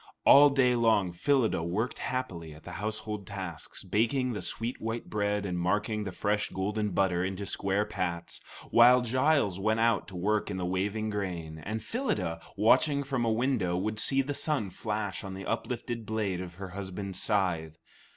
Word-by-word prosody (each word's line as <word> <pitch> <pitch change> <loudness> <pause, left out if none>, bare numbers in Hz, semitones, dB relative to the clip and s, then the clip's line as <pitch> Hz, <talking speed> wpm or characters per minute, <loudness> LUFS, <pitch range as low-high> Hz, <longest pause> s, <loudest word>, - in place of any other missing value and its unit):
All 145 +1 +9
day 130 -3 +3
long 110 -6 +3
Phyllida 115 - +1
worked 95 +9 -2
happily 85 -12 -4
at 75 - -15
the 90 - -8
household 105 -2 -4
tasks, 95 -6 -7
baking 115 +6 +1
the 105 - -4
sweet 115 +3 -3
white 115 +1 -4
bread 105 -1 0
and 90 -2 -2
marking 105 +4 0
the 95 - -4
fresh 105 +3 0
golden 105 +2 -1
butter 90 -2 +1
into 95 +1 -3
square 100 +1 0
pats, 85 -3 -4 0.3
while 125 +2 +7
Giles 130 - +2
went 110 +3 +1
out 115 -1 +2
to 95 - -10
work 105 +5 0
in 95 - -3
the 90 - -2
waving 100 +4 -1
grain; 85 -6 -4
and 110 +7 -4
Phyllida, 115 - -2 0.2
watching 140 +7 +4
from 135 -3 -1
a 115 - +2
window, 110 -7 +1
would 110 +3 -2
see 135 +5 +3
the 145 +2 -3
sun 140 -10 -1
flash 105 +1 -3
on 95 -1 -6
the 95 - -7
uplifted 120 -2 -3
blade 105 -5 -1
of 90 -2 -8
her 95 0 -7
husband's 95 0 -4
scythe. 85 -7 0
105 Hz, 175 wpm, -29 LUFS, 95-115 Hz, 0.3 s, All